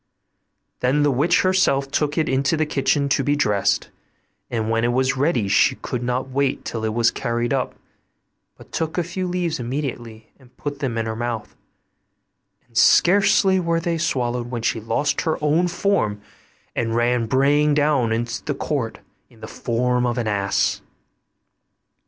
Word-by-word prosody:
Then 135 +4 +2
the 145 - +3
witch 150 +7 +2
herself 160 -8 +2
took 145 +1 0
it 160 - +1
into 135 +4 +1
the 155 - +1
kitchen 140 -1 +1
to 135 - +2
be 145 +2 +1
dressed; 105 -8 +1 0.6
and 110 -2 -2
when 115 0 +1
it 120 0 +1
was 130 +1 +1
ready 130 - +1
she 100 - +3
could 125 - -5
not 125 +2 -2
wait 135 0 -1
till 115 -2 -4
it 110 0 -2
was 120 0 +3
carried 120 0 -2
up, 130 -2 -1 0.8
but - - -16
took 160 +1 -3
a 175 - +2
few 180 +2 -4
leaves 175 -4 -2
immediately 120 -3 -5
and 125 -1 -22
put 145 -1 -5
them 125 -5 -2
in 115 - -1
her 110 0 -3
mouth, 115 -2 -4 1.1
and 120 - -30
scarcely 190 - +4
were 170 -1 0
they 165 -1 -2
swallowed 125 -6 -1
when 120 -2 -4
she 115 - 0
lost 140 +6 0
her 160 - -1
own 155 +4 +2
form 175 - 0 0.6
and 115 -1 -1
ran 120 0 +1
braying 145 +4 +3
down 145 -6 +2
into 115 +1 -2
the 145 - -2
court 135 -5 -3 0.3
in - - -21
the - - -8
form 125 +1 0
of 120 0 -2
an 120 - -1
ass. 100 -2 0
130 Hz, 170 wpm, -22 LUFS, 120-150 Hz, 1.1 s, scarcely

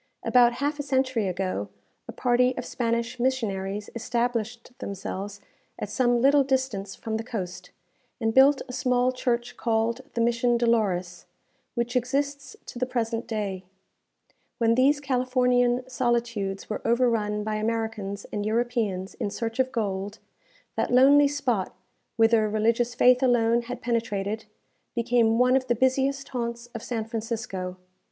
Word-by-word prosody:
About 240 -1 +5
half 290 +4 -2
a - - +1
century 260 -6 0
ago, 180 - -2 0.4
a - - -5
party 250 0 +2
of - - -4
Spanish 235 +1 -2
missionaries 210 -6 -1
established 235 0 -2
themselves 200 +1 -5 0.4
at - - -5
some 245 -2 +2
little 280 +3 +5
distance 260 -8 -1
from 220 -1 -3
the 225 - -4
coast, 180 -6 -6 0.5
and 225 -2 0
built 270 +2 +5
a 250 - -8
small 250 0 +2
church 240 -2 -2
called 230 +1 0
the 235 - +1
Mission 235 +1 +2
Dolores, 205 -7 0 0.5
which 240 +1 -2
exists 275 +2 -1
to 240 - -8
the 255 - 0
present 230 -2 -2
day. 200 -5 -3 0.9
When 230 -1 +3
these 270 +4 +4
Californian 250 -2 +1
solitudes 235 -6 -1
were 215 - -4
overrun 230 -3 +1
by 215 0 -2
Americans 220 -2 -3
and 205 - -1
Europeans 220 -4 -1
in - - -1
search 225 +3 -4
of 260 0 +2
gold, 205 -2 -3 0.6
that - - 0
lonely 280 +3 +6
spot, 260 -9 -1 0.4
whither 225 -1 +4
religious 230 +3 +1
faith 250 +1 +5
alone 240 -2 +3
had 245 +1 -7
penetrated, 220 -3 -2 0.5
became 235 -1 +2
one 250 +1 +4
of 260 -1 +1
the 240 - +2
busiest 270 +3 +1
haunts 235 -1 -4
of 230 - -6
San 225 -2 -3
Francisco. 220 -5 -4
235 Hz, 140 wpm, -26 LUFS, 215-250 Hz, 0.9 s, lonely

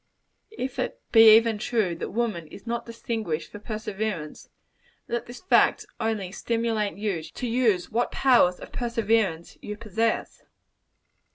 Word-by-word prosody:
If 255 0 -4
it - - -2
be 225 -1 +9
even 225 -2 +1
true, 215 -6 0
that - - -4
woman 215 -8 -2
is 200 - -13
not 235 0 -3
distinguished 225 -8 -4
for 205 - -9
perseverance, 215 -6 -5 0.6
let 235 0 -3
this 240 +1 -10
fact 370 - +3
only 220 -5 -2
stimulate 225 -1 -1
you 200 -5 -2
to 160 +10 -6
use 225 -7 +1
what 235 +2 0
powers 240 -9 +4
of - - -10
perseverance 225 -8 0
you 210 0 -6
possess. 225 +1 -2
220 Hz, 140 wpm, -26 LUFS, 195-235 Hz, 0.6 s, be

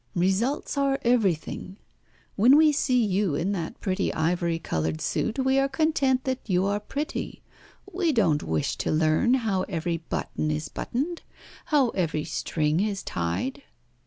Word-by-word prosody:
Results 200 +12 0
are 275 -1 +2
everything. 195 -5 0 0.6
When 245 +8 +6
we 310 0 +6
see 255 -5 +2
you 195 -5 +1
in 180 +7 -1
that 170 -5 -4
pretty 190 0 -1
ivory 170 +1 0
coloured 80 - -2
suit 225 - -1
we 265 0 +2
are 275 0 +2
content 270 -3 +1
that 260 -1 -1
you 185 0 +2
are 200 +1 0
pretty; 290 +9 -5 0.5
we 355 -3 +1
don't 180 - +2
wish 80 -2 -1
to - - -2
learn 155 +11 +3
how 220 -7 0
every 170 -2 -1
button 155 -1 -3
is 150 -1 -2
buttoned, 315 +8 -3 0.4
how 280 -5 +3
every 165 -7 -1
string 155 +1 -1
is 200 -1 -1
tied." 85 - -3
200 Hz, 150 wpm, -26 LUFS, 165-265 Hz, 0.6 s, When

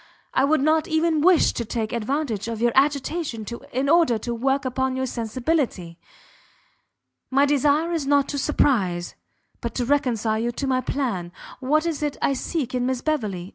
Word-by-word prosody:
I 270 - +3
would 300 0 +2
not 310 +2 +2
even 315 -1 +1
wish 355 0 +5
to 235 - -3
take 220 0 -3
advantage 235 -2 -2
of 230 -1 -4
your 240 +1 +2
agitation 280 -3 0 0.3
in 260 +3 -1
order 320 -6 +4
to 235 +2 -4
work 270 +4 0
upon 260 0 -1
your 260 0 -1
sensibility. 235 - -2 1.3
My 275 +2 +4
desire 290 +3 +2
is 320 -5 -2
not 285 -1 +3
to 285 - -2
surprize, 195 -12 +1 0.5
but 235 -2 -4
to 245 - -1
reconcile 235 -5 +1
you 235 +1 -1
to 275 - -3
my 260 -1 +1
plan. 230 -11 -2 0.3
What 300 +4 +1
is 325 -3 -2
it 295 -1 -2
I 275 - +1
seek 270 -1 -3
in 250 0 0
Miss 260 -1 -1
Beverley? 210 - -2
265 Hz, 175 wpm, -23 LUFS, 235-295 Hz, 1.3 s, wish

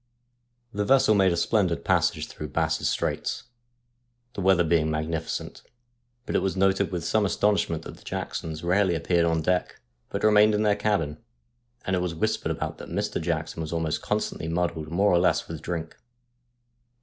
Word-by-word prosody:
The 105 0 -1
vessel 130 -1 +4
made 95 -3 +4
a 85 - 0
splendid 90 -2 +1
passage - - +2
through 75 - -7
Bass's 65 - 0
Straits, - - -2 0.9
the - - -5
weather 95 -2 +4
being 80 -1 +2
magnificent, 80 +1 -3 0.6
but - - -3
it - - +3
was 95 -1 -1
noted 95 +1 +2
with 85 -3 -3
some 110 - +2
astonishment 100 -5 +1
that - - -9
the - - -18
Jacksons 80 0 -5
rarely 90 0 +2
appeared 85 +1 +1
on 80 -1 +1
deck, 90 +2 0 0.3
but - - -4
remained 105 0 +5
in 105 - +1
their 105 -1 +3
cabin, 100 -8 -1 0.6
and 95 - 0
it - - +1
was 90 -2 -2
whispered 80 - -1
about - - -4
that - - -9
Mr. - - -2
Jackson 80 -1 -2
was 80 - -5
almost 80 -2 -1
constantly 80 - -2
muddled 85 -2 -2
more 100 +5 +2
or 85 - +5
less 90 - +2
with 80 -2 -7
drink. 85 -2 -4
85 Hz, 175 wpm, -26 LUFS, 80-100 Hz, 0.9 s, remained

